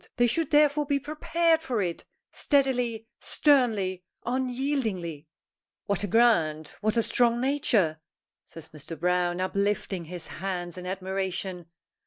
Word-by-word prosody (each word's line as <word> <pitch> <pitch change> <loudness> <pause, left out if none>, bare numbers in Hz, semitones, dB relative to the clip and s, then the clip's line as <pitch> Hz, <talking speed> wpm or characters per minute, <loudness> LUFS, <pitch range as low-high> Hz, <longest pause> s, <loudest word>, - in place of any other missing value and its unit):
They 240 - +3
should 290 +6 0
therefore 295 -1 +3
be 280 0 +1
prepared 320 +3 +1
for 255 -8 -2
it, 175 -4 -3 0.3
steadily, 250 -6 0
sternly, 220 - +2 0.2
unyieldingly!" 245 - -2 0.6
"What 200 -1 -1
a - - 0
grand 165 -9 +3
what 215 +2 0
a 230 - +4
strong 235 0 +2
nature!" 230 - +1 0.4
says 165 -1 -11
Mr. 155 0 -10
Browne, 180 0 +1
uplifting 195 -1 -1
his 175 0 -6
hands 175 -2 -4
in 180 0 -7
admiration. 190 -2 -3
205 Hz, 125 wpm, -27 LUFS, 180-260 Hz, 0.6 s, a